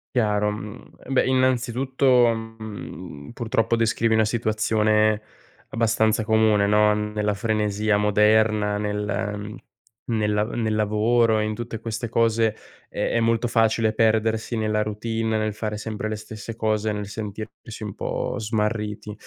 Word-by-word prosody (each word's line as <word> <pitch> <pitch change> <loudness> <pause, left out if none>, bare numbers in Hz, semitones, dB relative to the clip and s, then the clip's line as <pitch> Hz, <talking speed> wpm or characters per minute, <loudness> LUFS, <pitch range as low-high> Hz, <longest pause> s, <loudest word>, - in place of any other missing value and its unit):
Chiaro, 105 -3 +2
mhmm, 105 -1 -7 0.3
beh, 135 - +2
innanzitutto, 130 -1 +2
mhmm, 110 -9 -8
purtroppo, 115 -1 0
descrivi 115 0 +1
una 110 0 +4
situazione 110 -1 +1 0.5
abbastanza 110 -1 +1
comune, 110 -2 +3
no, 105 +1 +4
nella 105 0 -1
frenesia 105 0 0
moderna, 105 0 +3
nel 105 0 -3 0.5
nel 105 -2 0
a 105 - +3
nel 110 -2 0
lavoro 110 +2 +2
e - - +1
in 110 0 -2
tutte 115 0 -6
queste 115 +1 -4
cose, 115 -1 +2 0.3
è - - -2
è 115 - +1
molto 115 +1 +1
facile 115 -1 +2
perdersi 110 +1 +1
nella 110 -1 0
routine, 110 +1 -2
nel 110 0 -1
fare 110 0 -4
sempre 110 0 -4
le 110 - -2
stesse 110 +1 -8
cose, 110 -1 0
nel 105 -1 -4
sentirsi 110 +1 -7
un 105 -2 -5
po' - - -3
smarriti. 105 -1 -2
110 Hz, 135 wpm, -24 LUFS, 105-115 Hz, 0.5 s, una